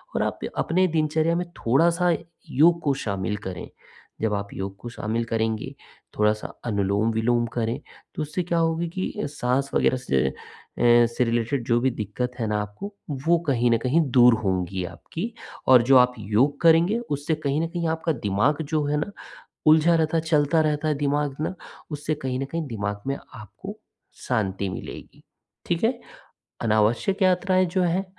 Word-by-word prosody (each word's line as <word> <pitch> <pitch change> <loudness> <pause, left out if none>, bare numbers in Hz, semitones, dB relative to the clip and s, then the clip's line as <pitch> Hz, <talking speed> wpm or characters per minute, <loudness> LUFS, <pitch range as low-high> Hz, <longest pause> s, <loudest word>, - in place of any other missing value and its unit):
और - - +1
आप - - -3 0.2
अपने 185 +3 +2
दिनचर्या 160 +1 +1
में 175 +1 -1
थोड़ा-सा 170 +8 +3 0.4
योग 170 +5 +4
को 140 - +1
शामिल 100 0 -2
करें। 90 -2 -6 0.5
जब 110 -2 +1
आप 100 0 -3
योग 95 0 -5
को 120 - -7
शामिल 115 0 -2
करेंगे, 110 -1 -2 0.4
थोड़ा-सा 105 0 +1 0.2
अनुलोम-विलोम 110 +3 +1
करें, 115 0 -1 0.4
तो - - -3
उससे 155 +4 -2
क्या 170 0 -1
होगी 165 +1 0
कि 185 +3 -3
अ, - - -1
साँस 135 -1 -1
वग़ैरह 130 - +2
से, 70 - -1 0.6
एँ 120 0 +6
इससे 115 +2 0
रिलेटेड 120 +2 0
जो 120 -1 +3
भी 130 +2 +2
दिक्कत 115 +3 -3
है 115 - -1
ना 105 0 0
आपको, 105 - -7 0.3
वो 170 0 +5
कहीं 120 -3 +2
न 115 - +4
कहीं 130 +8 +2
दूर 125 -2 +7
होंगी 95 -1 -1
आपकी 215 - -6 0.3
और 130 -2 +8
जो 135 - +8
आप 125 0 +5
योग 115 +8 +1
करेंगे, 170 +6 +5
उससे 150 -7 -2
कहीं 150 0 -1
न 165 - 0
कहीं 170 -1 -3
आपका 160 +1 0 0.2
दिमाग 130 +11 +2
जो 155 -1 +1
है 150 +1 0
ना, 155 +7 -2 0.6
उलझा 160 +2 +6
रहता 160 0 +1
है, 160 - +1
चलता 160 0 +2
रहता 155 0 0
है 150 - +2
दिमाग 145 -1 -1
ना, 160 - -2 0.4
उससे 150 +1 -2
कहीं 130 -1 -1
न 135 - -1
कहीं 165 +3 -4
दिमाग 105 -3 -3
में 140 - -1 0.2
आपको 110 -5 -10 0.5
शांति 100 -2 0
मिलेगी। 95 - -8 0.4
ठीक - - 0
है? - - +1 0.6
अनावश्यक 115 - +1
यात्राएँ 185 0 +3
जो 185 -2 +2
हैं, 180 +2 +1
135 Hz, 170 wpm, -24 LUFS, 110-160 Hz, 0.6 s, और